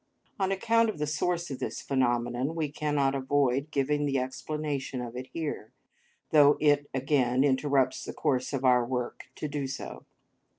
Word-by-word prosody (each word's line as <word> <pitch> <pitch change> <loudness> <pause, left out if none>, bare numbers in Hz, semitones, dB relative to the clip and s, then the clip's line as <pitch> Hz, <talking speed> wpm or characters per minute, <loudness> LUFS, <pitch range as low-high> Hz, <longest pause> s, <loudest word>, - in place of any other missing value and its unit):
On 190 0 +1
account 230 +3 +3
of 215 - -4
the 150 - -1
source 170 +3 -1
of 130 - -5
this 130 - -4
phenomenon, 120 +2 0
we 155 -3 -2
cannot 145 -2 0
avoid 135 +1 +1
giving 145 0 0
the 135 -1 +1
explanation 135 +1 -3
of 120 -1 -6
it 130 +1 -6
here, 150 -9 -4 0.6
though 145 -1 +6
it 145 -1 +3
again 130 -1 +2
interrupts 135 -1 +2
the - - -5
course 130 -2 0
of 135 -2 -2
our 125 -1 +5
work 125 0 -3
to 150 - -4
do 145 -2 -3
so. 135 - -7
140 Hz, 165 wpm, -29 LUFS, 130-150 Hz, 0.6 s, though